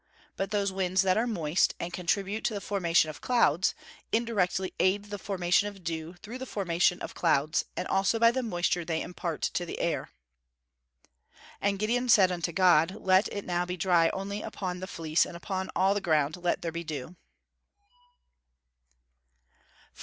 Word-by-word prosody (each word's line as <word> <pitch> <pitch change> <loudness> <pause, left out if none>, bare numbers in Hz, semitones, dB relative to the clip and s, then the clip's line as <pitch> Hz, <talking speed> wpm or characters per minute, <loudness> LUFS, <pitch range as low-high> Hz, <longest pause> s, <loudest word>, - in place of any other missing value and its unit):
But 195 0 -2
those 200 -2 0
winds 190 0 +1
that 185 -1 +3
are 230 +3 +1
moist, 170 -6 +1
and 170 +1 -5
contribute 195 +4 -1
to 220 - 0
the - - -2
formation 175 -6 +1
of 150 - -14
clouds, 190 - +2 0.4
indirectly 195 -5 0
aid 200 +3 +1
the 205 - -4
formation 190 0 +1
of 200 -3 -9
dew 165 +1 -4
through 240 +5 -7
the 260 - -6
formation 180 -3 +1
of - - -6
clouds, 155 -1 +1
and - - -2
also 195 +4 +2
by 230 +1 +5
the 260 +2 -1
moisture 175 -5 0
they 160 -1 -2
impart 170 -3 -5
to 175 - 0
the 175 - -6
air. 170 - -1
[Verse: 60 -1 -42 0.5
"And 200 0 +1
Gideon 240 +5 0
said 195 -5 +6
unto 175 -1 -2
God, 175 0 +4
Let 190 +2 +3
it 200 - -5
now 175 0 0
be 180 +1 -4
dry 170 -2 +3
only 200 +2 -4
upon 180 -4 -5
the 185 - -6
fleece, 165 -3 +1
and 170 - -7
upon 190 +1 -4
all 190 +2 +3
the 205 - -2
ground 155 -3 +1
let 175 -1 -1
there 165 - -2
be 170 +1 -5
dew." 155 +1 -6
180 Hz, 175 wpm, -28 LUFS, 165-200 Hz, 0.5 s, said